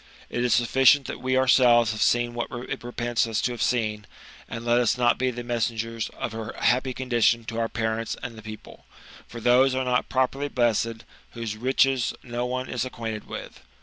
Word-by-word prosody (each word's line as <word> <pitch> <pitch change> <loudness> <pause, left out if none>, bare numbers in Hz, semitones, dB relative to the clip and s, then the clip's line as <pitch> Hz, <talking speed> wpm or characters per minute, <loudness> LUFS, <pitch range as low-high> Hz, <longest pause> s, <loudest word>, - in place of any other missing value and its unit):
It 120 - -1
is 125 - +1
sufficient 135 +4 +4
that - - -6
we 130 0 +1
ourselves 120 -3 +5
have 110 - -5
seen 120 0 +2
what 120 0 -3
it 120 -1 -6
repents 120 -1 -1
us 110 -2 -1
to 125 - 0
have 120 - -6
seen, 105 -4 0 0.4
and 115 0 -6
let 120 0 +3
us 120 0 +2
not 120 -1 +2
be 130 0 +1
the 120 -1 -5
messengers 115 -1 -2
of - - -3
her 110 0 -6
happy 130 +2 +2
condition 120 -2 +1
to 115 +1 -4
our 115 0 0
parents 110 0 -2
and 120 -2 -6
the 110 - -10
people; 110 0 -11 0.4
for 120 - -9
those 125 +3 +4
are 130 0 -1
not 125 0 0
poperly 135 +2 0
blessed 115 -3 0 0.3
whose 115 -3 -4
riches 130 +2 +1
no 120 0 -3
one 130 +1 -3
is 125 -3 -2
acquainted 115 -4 -5
with. 65 - -8
120 Hz, 195 wpm, -25 LUFS, 115-125 Hz, 0.4 s, ourselves